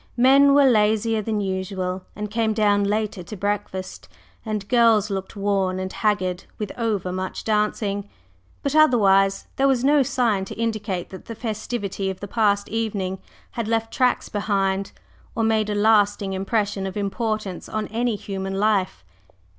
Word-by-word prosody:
Men 275 +3 +6
were 285 -1 +6
lazier 220 -2 +3
than 215 0 -2
usual 190 -1 -3
and 210 0 -5
came 225 0 +1
down 205 -2 +3
later 210 -1 -1
to 200 +4 -8
breakfast, 195 -1 -4 0.3
and 215 -3 -4
girls 225 -4 +4
looked 195 +2 -4
worn 195 -2 0
and 185 0 -4
haggard 190 -4 0
with 210 -2 -4
over 210 -6 -1
much 185 0 -4
dancing, 210 -2 -1 0.5
but 280 - -1
otherwise 195 -10 +4
there 275 - +3
was 260 -3 +2
no 290 +1 +5
sign 235 -6 +1
to - - -8
indicate 215 -5 -2
that 190 - -10
the 230 - -7
festivity 215 -3 -3
of 190 - -5
the 200 - -6
past 205 -2 +1
evening 200 -4 -2 0.3
had 235 -2 -3
left 225 0 -1
"tracks 250 -1 +1
behind," 195 -2 -1 0.4
or 225 - 0
made 220 -1 +1
a 210 - -1
lasting 205 -2 +3
impression 195 0 -1
of 190 - -6
importance 210 -2 -3
on 215 0 -2
any 235 +1 0
human 195 -1 -5
life. 195 - 0
210 Hz, 155 wpm, -23 LUFS, 195-225 Hz, 0.5 s, Men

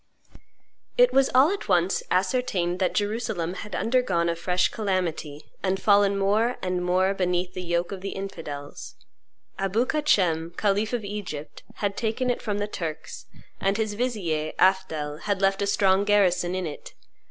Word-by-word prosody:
It - - +5
was 270 0 +4
all 275 +7 +6
at 400 - -4
once 180 0 +2
ascertained 185 -3 0
that 185 - 0
Jerusalem 205 -5 -1
had 200 0 -7
undergone 210 -9 +1
a 170 - 0
fresh 180 +2 +1
calamity, 175 -8 -2 0.2
and 190 0 0
fallen 200 0 +4
more 215 +5 +1
and 180 -1 -2
more 185 +2 +2
beneath 180 -1 -1
the 185 - -5
yoke 175 0 -1
of 195 -2 -6
the 195 - -4
infidels. 165 -8 -7 0.6
Abou 195 +5 +1
Kacem, 175 - +1
khalif 205 +1 +1
of 235 -4 -2
Egypt, 195 -8 -6
had 200 -1 -2
taken 245 +3 0
it 245 - -3
from 205 -2 -2
the 205 0 -1
Turks; 165 -7 -6 0.3
and 195 +1 +1
his 220 -2 -1
vizier, 195 -10 -2
Afdhel, 160 -6 +1
had 200 -2 -1
left 195 0 +2
a 200 - +1
strong 195 -1 +3
garrison 185 -3 +2
in 185 -1 -2
it. 150 -3 -8
195 Hz, 160 wpm, -25 LUFS, 175-210 Hz, 0.6 s, all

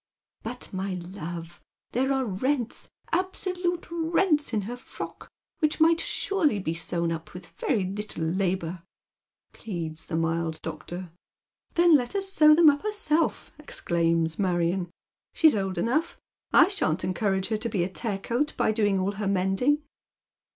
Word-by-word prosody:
" - - -66
But, 240 0 -6
my 190 0 -2
love, 175 -1 -7 0.3
there 265 +3 +1
are 265 -1 +1
rents, 240 +4 -2 0.2
absolute 360 0 -1
rents 330 -2 +2
in 215 -3 +1
her 225 +5 -5
frock 245 - -9 0.3
which 305 -2 +1
might 330 +1 +5
surely 335 - +1
be 175 -5 -2
sewn 170 0 -1
up 165 +1 -6
with 180 0 -8
very 215 -8 +1
little 200 -2 -4
labour," 180 0 -1 0.7
pleads 165 -7 -5
the 165 - -3
mild 165 -1 -1
doctor. 170 +2 -6 0.3
" - - -47
Then 345 -1 +6
let 245 -4 +1
her 400 - 0
sew 310 -6 +6
them 330 0 +6
up 285 - -4
herself," 410 -7 0
exclaims 165 - 0
Marion, 180 -1 +1 0.2
" - - -67
she's 315 -5 +6
old 195 -2 -2
enough. 295 +8 0 0.3
I - - +7
shan't 185 - 0
encourage 190 +1 0
her 220 - +1
to 230 +2 -3
be 195 -5 0
a - - 0
tear 200 +1 -3
coat 240 +9 -1
by 220 - +2
doiiig 205 -3 +2
all 190 +2 0
her 205 0 -3
mending." 195 +10 +2
205 Hz, 160 wpm, -27 LUFS, -, 0.7 s, I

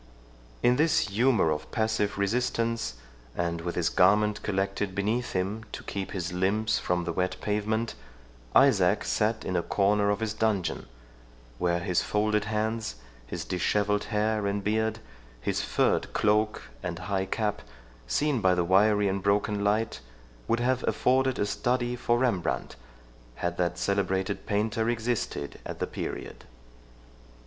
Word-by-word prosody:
In 125 +1 +4
this 155 -8 +3
humour 110 -5 +3
of 75 0 -3
passive 110 -2 0
resistance, 115 - 0 0.4
and 85 -1 -1
with 85 +1 -4
his 85 -2 +1
garment 105 +3 +3
collected 100 -1 -1
beneath 110 +5 -1
him 95 +4 -1
to - - -6
keep 100 -1 -4
his 90 -2 -4
limbs 105 +4 +1
from 90 0 0
the - - -3
wet 90 0 0
pavement, 110 +2 -1 0.6
Isaac 100 -7 +5
sat 110 +1 0
in 95 - -2
a 85 - +2
corner 100 +3 +2
of 105 -1 +1
his 110 -2 -2
dungeon, 110 -4 -1 0.7
where 85 -1 +2
his 90 0 +1
folded 105 0 +1
hands, 110 - -2 0.3
his - - -5
dishevelled 105 +3 0
hair 105 -1 0
and 100 0 -1
beard, 110 +1 0 0.4
his - - -1
furred - - +1
cloak 105 0 +2 0.2
and 85 - -4
high 95 +1 -2
cap, 105 +1 -1 0.5
seen 135 - +1
by 95 -1 +4
the 90 - +2
wiry 105 +3 +4
and 95 0 -1
broken 100 +1 +1
light, 110 +2 +1 0.5
would 115 - +2
have 130 +1 +1
afforded 130 0 +2
a - - +1
study 120 +3 0
for 120 -1 +1
Rembrandt, 120 -8 0 0.6
had 85 0 -3
that 85 -1 0
celebrated 95 +1 -1
painter 110 +2 0
existed 115 -10 -2
at - - -6
the - - -1
period. - - -6
105 Hz, 145 wpm, -28 LUFS, 95-110 Hz, 0.7 s, Isaac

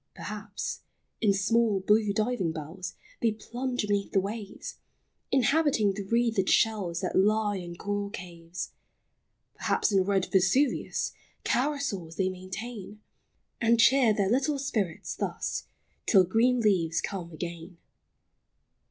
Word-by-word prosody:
Perhaps, 205 -1 -5 0.4
in 210 -3 +4
small, 210 +1 +2
blue 210 +2 +3
diving 215 -4 0
bells 160 +4 -6 0.3
They 225 -2 +2
plunge 245 +3 -3
beneath 200 -1 0
the 195 - +5
waves, 200 +1 -6 0.5
Inhabiting 265 -5 +3
the 200 - -4
wreathed 230 -3 +1
shells 195 -6 +2
That 185 - -2
lie 210 +1 +3
in 175 -2 -7
coral 205 +2 -3
caves. 175 -3 -7 0.8
Perhaps, - - 0
in 195 -2 +4
red 195 -1 +1
Vesuvius 195 +9 +2 0.3
Carousals 245 - -1
they 190 +1 +1
maintain; 195 +3 -7 0.6
And 235 0 +4
cheer 255 -1 +6
their 200 -1 +1
little 280 +4 +2
spirits 215 -11 -2
thus, - - -3 0.4
Till 195 -4 +7
green 235 +7 +2
leaves 175 -7 +2
come 180 -4 -4
again. 170 +2 -7
205 Hz, 120 wpm, -28 LUFS, 185-230 Hz, 0.8 s, Till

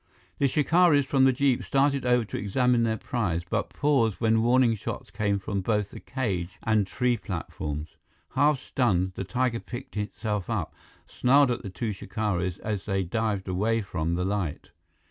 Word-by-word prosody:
The 140 - +4
shikaris 150 +1 +4
from 135 0 +3
the 135 - +6
jeep 135 -1 +1
started 140 -1 +1
over 125 -2 +3
to - - -5
examine 125 +4 +2
their 110 -1 +1
prize, 100 -10 -2
but - - -1
paused 135 -8 +1
when 110 -1 +3
warning 120 0 +4
shouts 110 - -6
came 100 -1 0
from 100 0 -3
both 105 0 0
the - - -9
cage 95 -9 -3
and 110 -3 +2
the - - -18
tree 125 -1 +1
platforms. 80 -7 -5 0.3
Half 145 -1 +2
stunned, 95 -10 0
the 95 - -4
tiger 115 +5 0
picked 120 0 -8
itself 105 -2 -3
up, - - -2 0.3
snarled 135 +1 +3
at 120 - -2
the 100 - -6
two 105 +3 -3
shikaris 95 -4 -2
as 105 -3 -3
they 95 -2 0
dived 105 +1 -2
away 105 +5 0
from 85 -3 -2
the 90 +1 -1
light. 95 -6 -3
110 Hz, 175 wpm, -27 LUFS, 95-125 Hz, 0.3 s, the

